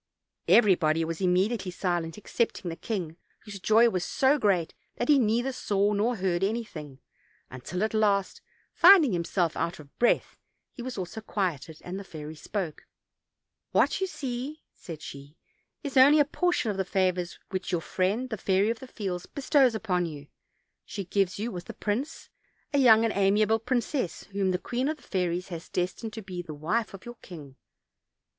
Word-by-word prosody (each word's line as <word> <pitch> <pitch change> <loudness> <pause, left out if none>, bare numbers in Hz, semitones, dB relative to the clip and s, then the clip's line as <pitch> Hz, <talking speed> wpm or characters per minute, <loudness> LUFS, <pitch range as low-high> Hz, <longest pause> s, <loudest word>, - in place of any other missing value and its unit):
Everybody 165 -7 +4
was 165 +1 -4
immediately 190 +3 +1
silent, 175 -2 -2
excepting 210 -3 -2
the 165 - -5
king, 170 -6 -4 0.2
whose 205 -2 -9
joy 220 +5 +5
was 185 -6 -1
so 270 +9 +2
great 185 -7 +1 0.2
that 240 - -3
he 290 -2 +6
neither 240 +3 +1
saw 205 -4 0
nor 220 +4 +1
heard 185 -3 0
anything, 195 - -3 0.5
until 155 +10 -4
at 220 - -1
last, 205 -3 +1 0.3
finding 340 - +7
him 170 -1 0
self 170 -1 0
out 170 - -2
of 145 -2 -15
breath, 240 - +2 0.3
he - - -9
also 245 -5 -4
was 175 - -7
quieted, 165 -6 -2
and 185 +2 -5
the - - -7
fairy 155 -4 -8
spoke: 170 0 -5 0.9
"What - - +3
you 380 - +1
see," 270 -1 -5
said 165 -4 -9
she, 140 +2 -10 0.5
"is 280 -2 -5
only 280 +4 +7
a 290 - +5
portion 325 -6 0
of 195 - -5
the 190 - +1
favors 185 -2 0
which 185 -1 -3
your 175 - +1
friend, 205 +10 -1
the 220 - -2
Fairy 195 +3 +2
of 230 - -5
the 260 - -10
Fields, 190 -7 -5
be 280 - -8
stows 260 -4 +4
upon 180 -5 0
you: 145 -3 -8 0.6
she 200 - -6
gives 195 +1 0
you, 225 +4 -3
with 180 -3 -7
the - - -9
prince, 225 +8 -3 0.5
a 285 - +3
young 225 -4 +6
and 225 - 0
amiable 210 +3 +3
princess, 245 - -2
whom 195 -1 0
the 180 - +1
queen 250 +8 -2
of 310 - -2
the - - -21
fairies 180 -1 -2
has 170 -2 -7
destined 180 +5 -2
to 220 0 -7
be 185 -2 -5
the 155 -3 -8
wife 200 +9 -1
of 190 - -13
your 240 0 -9
king. 145 -7 -11
195 Hz, 180 wpm, -28 LUFS, 175-235 Hz, 0.9 s, finding